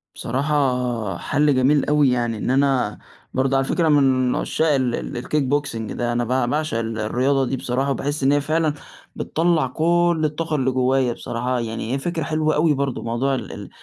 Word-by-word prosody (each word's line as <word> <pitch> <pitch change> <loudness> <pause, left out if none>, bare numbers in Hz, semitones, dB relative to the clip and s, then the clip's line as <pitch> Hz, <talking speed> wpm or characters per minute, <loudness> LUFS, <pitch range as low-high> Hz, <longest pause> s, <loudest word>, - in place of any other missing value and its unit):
بصراحة 125 - -1
حَل 145 +6 +1
جميل 135 +3 +3
أوي، 150 -2 +3
يعني، 120 -3 0
إن - - -3
أنا 135 -5 +1 0.3
برضه 135 +1 +1
على 135 - +1
فكرة 165 +3 +1
أنا 145 -2 +4
من 130 -2 +2
عُشّاق 160 -1 +1
ال 130 -3 +1 0.2
ال 120 - -4
الkickboxing 140 -6 -1
ده، 120 0 -2
أنا 120 0 0
ب - - -5 0.2
باعشق 155 -4 -1
ال 115 -1 -3
الرياضة 130 +5 +1
دي 130 +1 -2
بصراحة، 130 +3 -1
وباحس 145 +1 -2
إن 135 - +4
هي 145 0 +3
فعلًا 155 +1 0 0.4
بتطلّع 165 -3 +1
كلّ 170 +4 +1
الطاقة 155 +1 -2
اللي 130 -2 +1
جوّايا 130 -1 +1
بصراحة، 125 +2 -3
يعني 115 +1 -4
هي 135 - -1
فكرة 170 +1 -2
حلوة 155 +1 0
أوي 155 +1 +3
برضه 140 -2 -2
موضوع 125 +4 0
ال 130 - -6
ال - - -8
135 Hz, 185 wpm, -22 LUFS, 125-150 Hz, 0.4 s, أنا